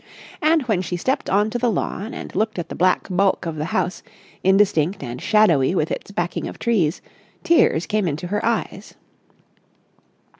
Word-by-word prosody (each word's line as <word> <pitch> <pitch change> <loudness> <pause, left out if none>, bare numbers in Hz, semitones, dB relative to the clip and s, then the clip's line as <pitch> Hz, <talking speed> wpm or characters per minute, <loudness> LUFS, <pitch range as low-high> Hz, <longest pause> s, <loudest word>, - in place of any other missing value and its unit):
And, 315 0 +3
when 215 -7 0
she 180 0 -3
stepped 260 +10 -1
on 205 +3 +2
to 240 - -2
the 245 0 +2
lawn 210 +1 -3
and - - -8
looked 220 -1 0
at 175 - -4
the - - -6
black 185 +1 +2
bulk 195 0 +1
of 165 -2 -4
the 150 - -2
house, 180 +1 -2 0.4
indistinct 190 -3 +2
and 125 0 -6
shadowy 180 -8 +3
with 155 -3 0
its - - -5
backing 175 -3 -3
of - - -8
trees, 195 -9 0 0.4
tears 255 - +3
came 210 -3 0
into 155 +2 -3
her 205 +4 -2
eyes. 235 0 -2
190 Hz, 175 wpm, -21 LUFS, 170-215 Hz, 0.4 s, And